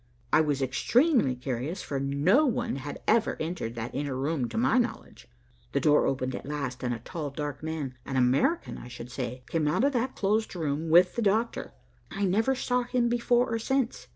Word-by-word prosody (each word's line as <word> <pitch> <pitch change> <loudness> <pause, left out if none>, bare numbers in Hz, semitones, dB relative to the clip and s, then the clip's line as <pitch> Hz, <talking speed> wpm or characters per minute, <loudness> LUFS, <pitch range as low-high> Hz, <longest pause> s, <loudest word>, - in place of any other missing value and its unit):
I 155 - +7
was 145 -3 0
extremely 230 - +2
curious 130 - -4
for 140 - -3
no 140 - +3
one 245 - 0
had 140 +2 -7
ever 225 0 +3
entered 155 -8 -3
that 115 +1 -5
inner 140 -2 -2
room 135 -2 -1
to - - -5
my 250 +2 +3
knowledge. 245 - -4 0.5
The - - +2
door 150 -1 +4
opened 130 -1 -1
at - - -6
last, 140 -4 -4
and 125 -1 -1
a 120 - -1
tall, 150 +6 -5
dark 145 0 -5
man, 155 -4 -4
an 135 - -5
American 130 - +1
I - - -10
should 125 0 -9
say, 125 -1 -5
came 160 -2 0
out 150 +10 +1
of 280 +1 +3
that 255 +1 -1
closed 215 +1 0
room 160 -1 -2
with 175 +3 +5
the 235 - -1
doctor. 220 +2 0 0.4
I 200 +1 -1
never 220 +8 +2
saw 250 -1 0
him 245 0 0
before 240 0 +2
or 230 - 0
since. 265 +1 -1
155 Hz, 200 wpm, -28 LUFS, -, 0.5 s, I